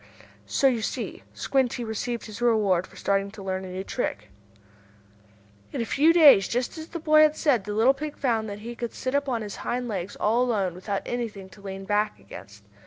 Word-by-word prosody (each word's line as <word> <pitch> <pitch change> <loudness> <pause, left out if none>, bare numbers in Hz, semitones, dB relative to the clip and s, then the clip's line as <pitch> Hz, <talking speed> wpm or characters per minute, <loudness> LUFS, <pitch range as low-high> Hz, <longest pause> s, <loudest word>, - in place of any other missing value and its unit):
So - - 0
you 250 -4 +4
see - - -4
Squinty 255 -3 0
received 230 +2 -3
his 220 +2 -9
reward 205 -7 +2
for - - -19
starting 195 0 0
to 200 -1 -10
learn 190 0 -3
a - - -8
new 185 +1 -5
trick. 105 - -4 1.4
In - - -4
a 230 - 0
few 300 +7 +4
days, 295 - +7
just 245 +1 -2
as 320 -1 -7
the 340 - -6
boy 310 -1 +5
had 310 0 +5
said, 250 -10 +2
the 210 - -4
little 235 +5 +5
pig 295 +2 -6
found 225 -5 0
that 205 +1 -7
he 240 0 -6
could 235 -1 -5
sit 255 0 -3
up 285 -1 +1
on 235 -3 -1
his 205 -2 -7
hind 245 0 -3
legs 195 -4 -4
all 225 +4 +2
alone, 210 -8 0
without 195 +3 -4
anything 215 -6 -4
to 200 - -16
lean 195 -1 -7
back 210 +1 0
against. 105 +1 -12
225 Hz, 210 wpm, -26 LUFS, 195-255 Hz, 1.4 s, days